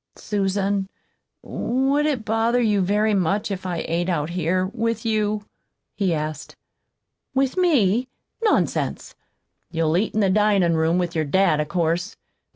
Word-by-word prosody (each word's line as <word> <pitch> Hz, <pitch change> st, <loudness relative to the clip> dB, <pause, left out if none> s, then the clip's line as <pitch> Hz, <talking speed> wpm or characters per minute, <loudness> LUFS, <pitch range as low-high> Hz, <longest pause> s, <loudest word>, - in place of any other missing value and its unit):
"Susan, 195 Hz, -1 st, -1 dB, 0.5 s
would 270 Hz, +4 st, 0 dB
it 260 Hz, -8 st, -1 dB
bother 225 Hz, +2 st, +1 dB
you 210 Hz, -4 st, +2 dB
very 210 Hz, +3 st, +2 dB
much 200 Hz, +3 st, 0 dB
if 190 Hz, -1 st, -4 dB
I 175 Hz, -2 st, -3 dB
ate 175 Hz, +2 st, -1 dB
out 160 Hz, -2 st, -1 dB
here 180 Hz, +1 st, 0 dB
with 230 Hz, +2 st, -2 dB
you?" 215 Hz, -1 st, 0 dB, 0.5 s
he 195 Hz, -3 st, 0 dB
asked. 155 Hz, -2 st, -4 dB, 0.8 s
"With 265 Hz, -1 st, +1 dB
me? 255 Hz, -, +2 dB, 0.4 s
Nonsense! 435 Hz, -, 0 dB, 0.6 s
You'll 165 Hz, -1 st, 0 dB
eat 210 Hz, +3 st, -1 dB
in -, -, +2 dB
the 195 Hz, -2 st, +3 dB
dinin' 200 Hz, -4 st, +3 dB
room 160 Hz, +2 st, +2 dB
with 175 Hz, -2 st, -1 dB
your 160 Hz, -1 st, 0 dB
dad, 180 Hz, 0 st, +2 dB
of 150 Hz, -, -1 dB
course. 170 Hz, +5 st, -1 dB
195 Hz, 145 wpm, -23 LUFS, 175-220 Hz, 0.8 s, the